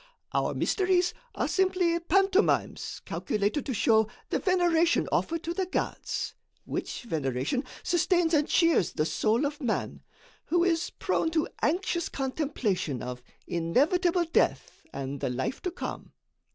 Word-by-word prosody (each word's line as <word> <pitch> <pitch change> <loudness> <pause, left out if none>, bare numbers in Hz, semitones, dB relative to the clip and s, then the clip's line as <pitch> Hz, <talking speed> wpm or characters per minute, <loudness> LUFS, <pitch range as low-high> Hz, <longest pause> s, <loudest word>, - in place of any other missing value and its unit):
Our - - 0
mysteries 365 -2 +2 0.2
are - - 0
simply 365 -3 +2
pantomimes 385 +4 +1
calculated 210 +8 -1
to 265 - -1
show 220 +1 +4 0.2
the - - +1
veneration 345 -3 +3
offered 330 0 0
to 335 - -2
the 370 +1 -1
gods, 370 - -2 0.3
which - - -4
veneration 145 - -1 0.2
sustains 350 -1 +2
and 300 -1 +3
cheers 335 - +3
the 155 - 0
soul 225 - +1
of 295 +1 -4
man, 245 -5 -2 0.4
who 345 +2 +2
is 340 -2 +1
prone 325 - -1
to 320 -1 0
anxious 345 +1 0
contemplation 260 - -2
of 125 0 -5 0.2
inevitable 330 - +2
death 330 - 0
and 135 +1 -5
the - - -1
life 130 - -3
to 365 - -1
come. 360 - -6
320 Hz, 135 wpm, -28 LUFS, 220-350 Hz, 0.4 s, show